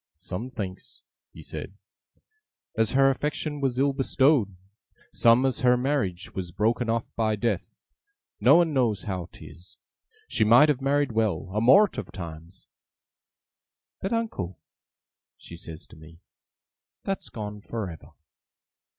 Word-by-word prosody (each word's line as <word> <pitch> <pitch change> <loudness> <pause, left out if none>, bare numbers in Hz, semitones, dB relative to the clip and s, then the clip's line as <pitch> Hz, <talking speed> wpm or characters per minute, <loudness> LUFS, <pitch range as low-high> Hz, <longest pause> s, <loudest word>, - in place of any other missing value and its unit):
'Some 95 +8 -6
thinks,' 110 +2 -7 0.3
he - - -12
said, - - -7 1.0
'as 110 +1 +1
her 135 0 +5
affection 145 +2 -3
was 130 -3 0
ill 140 +1 +2
bestowed; 135 -6 +2 0.6
some, 120 +3 +5
as 130 - 0
her 125 -1 +4
marriage 125 -9 -2
was 90 -2 -4
broken 115 +5 0
off 115 0 0
by 110 -1 +1
death. 115 +3 -1 0.7
No 135 +5 +6
one 170 -2 +3
knows 120 -7 +1
how 90 -3 -4
'tis. 85 +2 -14 0.5
She - - +2
might 120 +8 +6
have 140 -3 +1
married 140 0 +1
well, 110 -4 -1
a 105 - 0
mort 195 - +5
of - - -7
times, 85 -1 -9 1.4
"but, 195 - -3
uncle," 220 - -3 0.8
she 85 - -11
says 80 -2 -10
to - - -17
me, 80 +1 -15 0.8
"that's 195 0 -4
gone 105 -2 -7
for 110 -1 -5
ever." 80 -3 -11
115 Hz, 135 wpm, -26 LUFS, 95-135 Hz, 1.4 s, No